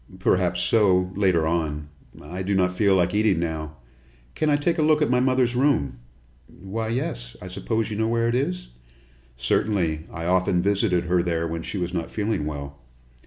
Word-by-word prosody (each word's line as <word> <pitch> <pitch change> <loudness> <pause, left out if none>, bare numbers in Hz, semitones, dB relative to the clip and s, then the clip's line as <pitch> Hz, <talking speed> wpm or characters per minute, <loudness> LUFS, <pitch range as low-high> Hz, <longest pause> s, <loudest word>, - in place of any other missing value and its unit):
"Perhaps 90 -1 +1
so, 95 -2 +3
later 95 -5 +2
on. 75 -2 -1 0.3
I 90 +5 -7
do 100 +1 -1
not 90 -1 +1
feel 100 -1 +3
like 90 0 +2
eating 105 -3 +2
now. 80 -2 -3 0.6
Can 155 - 0
I 145 - +4
take 165 +3 0
a - - +3
look 155 0 +4
at 150 - +1
my 125 - +3
mother's 130 -1 +2
room?" 75 - +1 0.5
"Why, 110 +4 -5
yes. 125 0 -3
I 90 - -8
suppose 110 +4 -2
you 105 - -3
know 110 0 +1
where 115 0 +1
it 120 - 0
is?" 90 - -2 0.7
"Certainly; 80 - 0
I 85 -1 -5
often 90 0 +2
visited 100 -3 +1
her 90 0 +2
there 85 -1 -1
when 80 0 -4
she 100 - -5
was 90 -1 -3
not 85 -2 -3
feeling 105 -7 -2
well." 70 -1 -6
95 Hz, 185 wpm, -24 LUFS, 85-115 Hz, 0.7 s, I